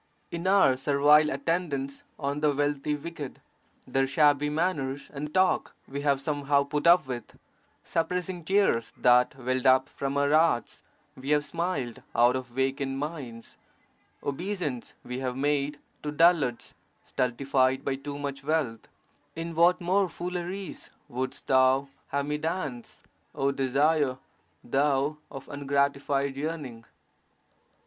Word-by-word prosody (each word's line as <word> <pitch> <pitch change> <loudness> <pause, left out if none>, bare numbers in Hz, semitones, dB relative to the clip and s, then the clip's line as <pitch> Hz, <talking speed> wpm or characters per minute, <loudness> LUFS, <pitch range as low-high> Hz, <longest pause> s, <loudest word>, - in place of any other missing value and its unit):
In 170 +2 -3
our 190 -10 +5
servile 145 +2 +4
attendance 140 -2 -2 0.2
on 140 0 -2
the 150 -1 +3
(wealthy) 145 +1 0
wicked, 150 -2 -7 0.5
their 135 0 +1
shabby 145 +1 +3
manners 150 -4 -2
and 150 +1 -5
talk 185 +2 +2
we 140 +1 -5
have 140 -2 +2
somehow 140 0 +1
put 145 +3 -1
up 175 -2 +6
with; 125 -2 -7 0.5
suppressing 180 +1 -2
tears 190 - +2
that 125 +1 +4
welled 130 0 -1
up 130 0 +5
from 140 0 -3
our 140 0 +2
hearts, 155 -7 +2 0.3
we 130 +2 -7
have 150 0 +3
smiled 165 -9 -3
out 120 +2 +5
of 130 -1 -3
vacant 135 +2 -1
minds; 135 -6 -6 0.6
obeisance 155 - -3
we 125 +1 -5
have 130 -1 -3
made 145 +1 0 0.2
to 150 - -3
dullards 150 -6 +2 0.3
stultified 130 +1 +1
by 140 - 0
too 140 +1 -6
much 140 -1 -5
wealth; 140 -7 -1 0.5
in 165 +1 -4
what 170 +2 +4
more 185 +2 +1
fooleries 180 +3 -5 0.2
wouldst 130 +2 -4
thou 130 +1 +4 0.2
have 140 0 -1
me 150 +1 -2
dance, 150 -7 -4 0.3
oh 135 0 +1
Desire, 140 +1 +2 0.5
thou 140 +3 +1
of 135 - -9
ungratified 140 -1 0
yearning! 140 -6 -5
140 Hz, 130 wpm, -28 LUFS, 135-155 Hz, 0.6 s, up